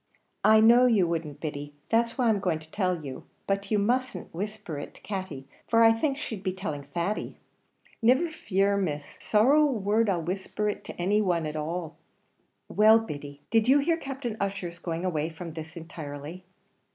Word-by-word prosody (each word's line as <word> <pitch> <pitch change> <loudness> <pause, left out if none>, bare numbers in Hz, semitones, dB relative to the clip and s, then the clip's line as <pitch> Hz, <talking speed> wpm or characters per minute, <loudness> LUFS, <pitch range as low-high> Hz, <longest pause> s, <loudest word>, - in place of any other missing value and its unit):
"I 220 0 +7
know 240 +3 +7
you 205 -7 +3
wouldn't, 160 -4 -3
Biddy; 145 -2 -5
that's 230 0 +1
why 245 -3 +3
I'm 210 -2 +2
going 180 -5 0
to 160 0 -14
tell 180 -6 -1
you; 130 -2 -7 0.2
but 195 0 -1
you 215 - +2
mustn't 240 -1 -1
whisper 205 -4 -5
it - - -8
to - - -17
Katty, 185 -10 -5 0.2
for 230 0 +5
I 225 - +8
think 270 +5 0
she'd 220 -8 -5
be 185 -1 -2
telling 180 -7 -4
Thady." 170 +8 -3 0.6
"Niver 260 +9 +4
fear, 200 -8 +1
Miss; 150 -7 -3
sorrow 255 +8 +4
a - - +5
word 215 -1 +1
I'll 175 -4 0
whisper 190 +4 -3
it 210 - -3
to - - -9
any 200 +4 +2
one, 175 -5 +1
at 155 0 -4
all 150 0 -2
at - - -3
all." 170 -2 -5 0.8
"Well, 215 +1 +8
Biddy, 145 -9 -6
did 225 0 +3
you 270 +3 +6
hear 315 +4 +2
Captain 270 -7 -5
Ussher's 190 -4 -3
going 170 0 -3
away 160 -3 -1
from 165 0 -8
this 160 +1 -8
intirely?" 160 +1 -8
190 Hz, 190 wpm, -27 LUFS, 160-225 Hz, 0.8 s, I